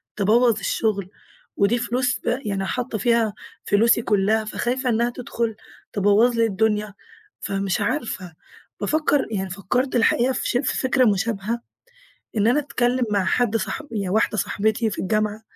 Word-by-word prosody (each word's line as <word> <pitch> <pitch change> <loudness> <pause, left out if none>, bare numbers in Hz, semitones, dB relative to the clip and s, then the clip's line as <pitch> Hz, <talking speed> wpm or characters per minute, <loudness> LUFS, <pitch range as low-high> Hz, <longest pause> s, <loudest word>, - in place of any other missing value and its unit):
تبوّظ 220 +2 +3
الشغل. 200 -2 -1 0.5
ودي 200 +4 +3
فلوس 250 +2 0
ب 240 +2 -1
يعني 195 -2 -2
حاطّه 245 +2 -3
فيها 230 0 +2 0.3
فلوسي 230 +3 +4
كلّها، 215 0 +1
فخايفة 250 +4 -2
إنها 235 +1 +2
تدخُل 235 -2 -3 0.4
تبوّظ 205 +4 +3
لي 230 0 +3
الدنيا. 210 -1 0 0.5
فمش 195 -2 -2
عارفة، 205 - -3 0.5
بافكّر 300 -2 +1
يعني 190 -2 -2
فكّرت 245 +8 -1
الحقيقة 240 +2 +3
في - - -2
ش - - +2
في 260 +1 -1
فكرة 260 -1 +2
مشابهة، 215 +2 0 0.8
إن 210 - +3
أنا 245 +5 +4
أتكلّم 250 -3 0
مع 200 -2 +1
حد 230 +3 +1
صاح 215 +9 -3
هي 200 -3 -2
واحدة 215 +2 +1
صاحبتي 220 +3 0
في 210 - -6
الجامعة، 215 +2 -1
220 Hz, 145 wpm, -23 LUFS, 205-245 Hz, 0.8 s, فلوسي